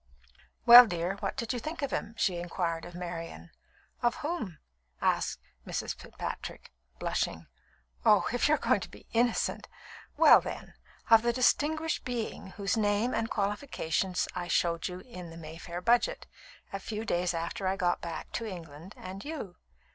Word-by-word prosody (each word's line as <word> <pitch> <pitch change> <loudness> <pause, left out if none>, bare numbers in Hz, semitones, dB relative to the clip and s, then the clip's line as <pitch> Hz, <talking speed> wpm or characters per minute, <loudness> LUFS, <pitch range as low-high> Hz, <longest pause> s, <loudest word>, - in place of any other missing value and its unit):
"Well, 240 0 +12
dear, 175 +1 -2
what 200 +3 -3
did 235 -1 -2
you 245 - -2
think 310 +4 -5
of 275 - -1
him?" 220 +1 -3
she 180 -3 +1
inquired 170 -1 -2
of 175 0 -10
Marian. 165 - -6 0.5
"Of 240 0 +2
whom?" 295 - -3 0.4
asked - - +1 0.2
Mrs. - - -3
Fitzpatrick, - - -7 0.3
blushing. - - -2 0.6
"Oh, - - +5
if - - +2
you - - +5
are - - -3
going - - +2
to - - -7
be - - -15
innocent! 235 0 +1 0.5
Well, - - +8
then, - - -7 0.4
of 225 -1 +9
the 235 +1 +2
distinguished 310 +6 +1
being 240 -5 -4
whose 195 -2 0
name 215 +3 +1
and 225 - -1
qualifications 195 - -1
I 175 -1 -4
showed 170 -1 +1
you 180 0 -7
in 180 -8 -9
the 165 - -10
Mayfair 165 +2 -7
Budget 240 - +2 0.5
a 195 - -2
few 215 +2 -5
days 175 -2 0
after 170 +3 -3
I 190 - +1
got 175 -2 0
back 170 -1 -6
to 230 - -3
England 170 -1 -9
and 190 +2 -8
you. 285 - -6
195 Hz, 160 wpm, -30 LUFS, 175-235 Hz, 0.6 s, Well